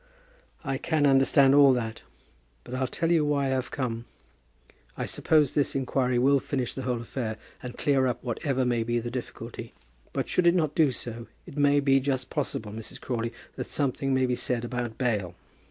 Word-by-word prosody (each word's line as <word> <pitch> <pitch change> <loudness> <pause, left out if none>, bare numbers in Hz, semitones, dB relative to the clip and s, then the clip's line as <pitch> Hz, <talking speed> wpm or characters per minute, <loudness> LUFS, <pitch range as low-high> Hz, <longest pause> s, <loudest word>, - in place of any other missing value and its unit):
"I 135 -3 -2
can 155 -3 +1
understand 135 0 +5
all 140 -2 +7
that; 115 -3 -3 0.6
but 125 - -10
I'll 130 0 0
tell 165 +5 -1
you 165 -3 +4
why 145 -1 +1
I - - 0
have 130 -1 -1
come. 120 -3 -3 0.9
I - - -2
suppose 150 -4 +2
this 145 - +1
inquiry 130 -1 +1
will 135 +3 +4
finish 130 -2 -3
the 135 - -5
whole 125 -2 -1
affair, 115 -2 -4 0.2
and 125 -1 -7
clear 135 -2 +2
up 125 - -3
whatever 130 +2 -1
may 120 -2 +1
be 120 +1 0
the 120 0 -3
difficulty. 115 -2 -7 0.4
But - - -2
should 180 -1 +2
it 170 - +5
not 155 -5 +1
do 155 -4 +4
so, 120 -2 -6 0.2
it - - -11
may 145 -1 +4
be 135 -1 +4
just 130 -2 -2
possible, 105 -1 -3
Mrs. 110 +1 -7
Crawley, 115 -2 -3 0.3
that - - -5
something 135 -1 -1
may 130 -1 +3
be 125 -1 0
said 120 -1 -1
about 120 -2 -4
bail. 105 -9 -1
130 Hz, 190 wpm, -27 LUFS, 120-140 Hz, 0.9 s, all